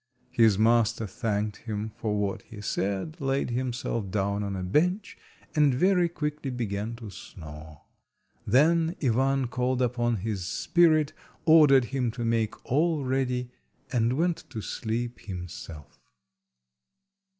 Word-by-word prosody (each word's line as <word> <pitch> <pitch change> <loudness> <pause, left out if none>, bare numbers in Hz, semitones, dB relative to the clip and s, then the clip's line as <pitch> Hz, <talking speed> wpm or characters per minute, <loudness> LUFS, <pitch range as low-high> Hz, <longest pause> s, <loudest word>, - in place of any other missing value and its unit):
His 110 -4 +4
master 115 +1 +3
thanked 105 0 -2
him 110 -1 -4
for 105 -2 -2
what 100 -1 -1
he 110 - -12
said, 100 - -2
laid 135 -2 0
himself 120 -4 -2
down 100 +1 0
on 100 -1 -3
a 95 - -4
bench, 180 - +1 0.4
and 145 -4 +4
very 180 +3 +3
quickly 150 -3 -3
began 115 -2 -3
to 115 -3 -9
snore. 75 -4 -11 0.6
Then 165 +5 +3
Ivan 135 +2 +2
called 125 +1 -1
upon 120 -1 +1
his 100 -3 -3
spirit, 155 - +3 0.3
ordered 150 -5 +7
him 130 -3 +1
to 120 -1 -4
make 115 -1 -1
all 155 +1 +1
ready, 125 -1 -1 0.4
and 120 -1 +2
went 170 +4 0
to 110 - -5
sleep 115 +3 -3
himself. 90 -5 -8
120 Hz, 130 wpm, -27 LUFS, 105-140 Hz, 0.6 s, ordered